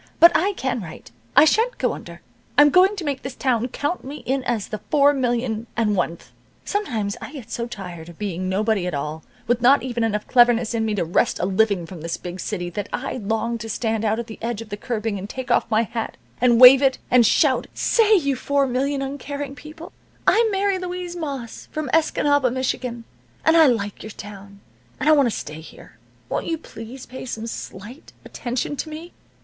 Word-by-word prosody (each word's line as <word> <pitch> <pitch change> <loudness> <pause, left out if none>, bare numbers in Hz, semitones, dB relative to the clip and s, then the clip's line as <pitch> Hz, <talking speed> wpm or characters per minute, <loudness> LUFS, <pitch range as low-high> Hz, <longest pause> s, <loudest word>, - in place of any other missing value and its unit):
But 340 +1 +9
I 395 +5 +2
can 260 - -2
write. 160 -9 -10 0.2
I 295 - +8
sha'n't 455 +10 +2
go - - 0
under. - - -10 0.4
I'm 290 0 +7
going 375 +5 +5
to 385 - -5
make 280 -4 -2
this 265 -1 -6
town 245 -3 0
count 290 +7 -3
me 280 +3 -8
in 265 +1 0
as 230 -5 -1
the 215 - -4
four 285 -1 +5
million 240 -3 -1
and 215 -3 +2
oneth. 170 -2 -3 0.3
Sometimes 225 - -2
I - - -8
get 240 -6 -9
so 235 0 -3
tired 175 -7 -8
of 170 - -13
being 185 -3 -3
nobody 200 -1 0
at 175 - -2
all, 150 +3 -4 0.2
with 240 0 +1
not 260 +3 +5
even 240 -3 -2
enough 210 -2 -1
cleverness 240 -2 +4
in 225 -1 0
me 215 -1 -1
to 185 - 0
wrest 165 - +1
a - - -1
living 195 -2 +1
from 170 -1 -10
this 170 +1 -3
big 180 +1 -7
city, 180 -4 -3
that 205 +3 -5
I 265 0 -3
long 225 +1 -2
to 225 +1 -7
stand 220 0 -1
out 220 0 +1
at 235 - -3
the 220 -1 -10
edge 230 -1 -3
of 230 -1 -8
the 205 - -4
curbing, 220 -2 -3
and 195 +2 -7
take 260 +1 -5
off 235 - +2
my 220 0 +3
hat, 230 0 -5 0.2
and 240 -2 +4
wave 255 +2 +10
it, 265 -2 +3
and 250 -1 +6
shout, 265 +4 +3
'Say, 440 -2 +4
you 280 -7 +1
four 280 +2 +1
million 270 +2 -1
uncaring 280 +1 -5
people, 310 +3 -11 0.3
I'm 455 0 +4
Mary 395 -1 +1
Louise 360 -1 -5
Moss, 275 -8 -6
from 305 -4 -4
Escanaba, 290 -4 +3
Michigan, 250 -2 -2 0.4
and 320 - +5
I 320 -2 +7
like 205 -5 -1
your 215 - -8
town, 200 -1 -11 0.4
and 285 - -2
I - - +7
want 285 -4 +5
to - - +1
stay 155 +2 -7
here. 160 - -15 0.3
Won't - - -3
you 330 - -1
please 250 -3 -10
pay 260 - -9
some 225 -2 -5
slight 230 +3 -8
attention 245 +4 -3
to 315 - -4
me. 320 +3 -9
240 Hz, 210 wpm, -22 LUFS, 215-285 Hz, 0.4 s, wave